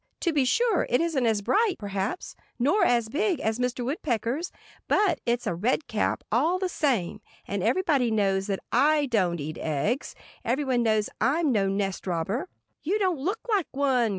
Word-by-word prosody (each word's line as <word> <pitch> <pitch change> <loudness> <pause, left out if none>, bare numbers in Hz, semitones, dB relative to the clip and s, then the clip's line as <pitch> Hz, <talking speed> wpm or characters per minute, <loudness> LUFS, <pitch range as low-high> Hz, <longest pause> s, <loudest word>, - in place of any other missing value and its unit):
To 340 - +1
be 285 -3 +2
sure, 455 - +2
it 245 - +3
isn't 310 -7 +1
as 215 -2 +1
bright, 420 - +2
perhaps, 200 - -4 0.2
nor 290 - +2
as 235 -2 +3
big, 345 - 0
as 220 +2 -1
Mr. 250 0 -1
Woodpecker's. 265 - -2 0.4
But 410 -3 +2
it's 240 0 0
a - - 0
red 235 - 0
cap, 215 - -1
all 305 +11 +2
the 370 -1 -2
same. 260 - -1 0.3
And - - -2
everybody 295 -10 +2
knows 195 -3 +1
that 195 -2 -2
I 300 0 +4
don't 185 -9 +1
eat 155 +2 -5
eggs. 160 - -1 0.3
Everybody 255 +1 0
knows 215 -2 +2
I'm 290 +6 +2
no 200 -4 +2
nest 195 0 -2
robber." 190 - -2 0.3
"You 375 +7 0
don't 370 -7 0
look 385 +11 -2
like 410 -7 +1
one!" 265 -4 +1
250 Hz, 175 wpm, -26 LUFS, 210-325 Hz, 0.4 s, I